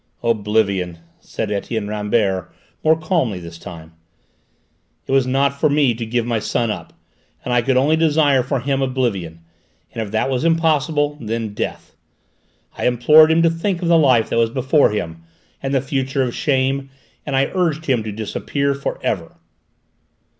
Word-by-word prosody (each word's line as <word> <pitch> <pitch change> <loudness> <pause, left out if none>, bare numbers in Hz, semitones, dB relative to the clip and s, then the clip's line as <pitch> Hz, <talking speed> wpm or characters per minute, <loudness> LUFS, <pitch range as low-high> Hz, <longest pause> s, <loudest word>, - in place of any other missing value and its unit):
"Oblivion," 105 -6 0 0.2
said 105 - -5
Etienne 105 +1 -3
Rambert, 105 -3 -1 0.3
more 160 +1 +3
calmly 155 - 0
this 85 -1 -10
time. 80 -2 -10 1.1
"It - - -6
was 135 -1 +3
not 140 +1 +1
for 155 - +3
me 145 -4 +3
to 115 0 -5
give 120 0 -1
my 120 -2 0
son 115 +1 -1
up, - - -7 0.5
and 125 - -1
I 120 - +4
could 130 +2 +1
only 145 +5 +3
desire 150 -4 +3
for 130 +1 -2
him 135 +1 -1
oblivion, 110 -11 -2 0.5
and 115 - -4
if 110 - -4
that 110 +4 0
was 130 0 -1
impossible, 155 -3 +1
then 110 -1 -3
death. - - -5 0.9
I - - +1
implored 150 +6 +6
him 165 +1 +3
to 165 - +5
think 175 +2 -2
of 170 - 0
the 170 - +5
life 130 -7 +3
that - - +1
was 115 -1 +3
before 130 +4 +2
him, 85 -6 -4 0.4
and 135 - -3
the 135 -2 +2
future 135 0 -1
of 120 -2 -2
shame, 135 -1 0 0.3
and 140 - -3
I 135 +1 +1
urged 165 -4 0
him 130 -5 +1
to 110 0 -5
disappear 140 +7 -2
for 140 0 -4
ever." 85 -6 -2
130 Hz, 170 wpm, -19 LUFS, 110-145 Hz, 1.1 s, implored